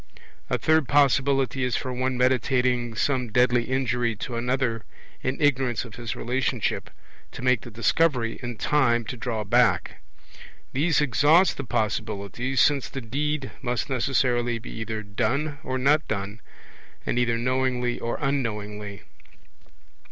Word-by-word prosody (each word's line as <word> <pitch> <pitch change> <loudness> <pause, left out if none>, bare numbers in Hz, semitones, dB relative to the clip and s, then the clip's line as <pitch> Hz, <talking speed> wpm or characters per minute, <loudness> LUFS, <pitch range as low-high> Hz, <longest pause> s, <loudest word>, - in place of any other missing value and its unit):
A - - +1
third 160 -3 +2
possibility 135 -1 +3
is 125 -2 0
for 130 -2 -3
one 130 0 -1
meditating 125 -1 +1
some 125 -1 0
deadly 125 0 +3
injury 120 -3 0
to 120 +3 -5
another, 120 -1 -1 0.4
in 130 +1 -2
ignorance 130 -6 +1
of 115 - -11
his 120 -1 -5
relationship, 125 +1 -1 0.4
to - - -8
make 125 -3 +3
the - - -9
discovery 120 +1 +1
in 120 -2 -5
time 120 -5 +2
to 125 - -5
draw 115 -2 -3
back. 120 +2 +2 0.7
These 155 +3 +2
exhaust 150 - +4
the - - -3
possibilities, 110 +3 -2
since 145 -3 +2
the 135 - -5
deed 140 +4 -2
must 125 +3 -2
necessarily 120 -2 +1
be 115 - -9
either 110 -1 -4
done 140 +9 -1
or 130 -4 -3
not 145 +4 +2
done, 100 +1 -4 0.6
and 125 - 0
either 120 -1 +1
knowingly 125 0 0
or 115 - -2
unknowingly. 105 -7 -3
125 Hz, 135 wpm, -25 LUFS, 115-135 Hz, 0.7 s, exhaust